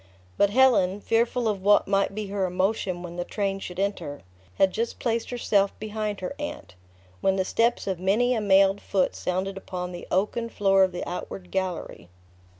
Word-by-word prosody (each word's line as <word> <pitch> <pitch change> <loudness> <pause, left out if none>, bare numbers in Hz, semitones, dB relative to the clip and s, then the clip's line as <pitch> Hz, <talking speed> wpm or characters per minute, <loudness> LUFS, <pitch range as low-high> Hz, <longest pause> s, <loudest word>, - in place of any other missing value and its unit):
But 200 - +3
Helen, 205 -5 +4
fearful 230 +2 +1
of 205 -3 -1
what 205 +2 +4
might 195 0 +1
be 215 0 -3
her 195 -1 0
emotion 185 -1 -1
when 175 0 -8
the 175 - -1
train 195 0 -2
should 180 -2 -7
enter, 185 -8 -3 0.3
had 190 - +3
just 230 +1 -2
placed 230 -1 -1
herself 205 -5 +1
behind 215 -1 -3
her 185 - -4
aunt, 195 - -6 0.5
when 190 - +2
the 190 -1 0
steps 230 +4 +1
of 190 -3 -2
many 215 +7 +2
a 225 - 0
mailed 195 0 +4
foot 190 -2 0
sounded 190 +2 -2
upon 180 -2 -5
the 175 -1 -8
oaken 210 +5 0
floor 195 -3 +3
of 185 - +2
the 175 - -5
outward 180 +1 -6
gallery. 185 - -3
195 Hz, 180 wpm, -26 LUFS, 185-215 Hz, 0.5 s, Helen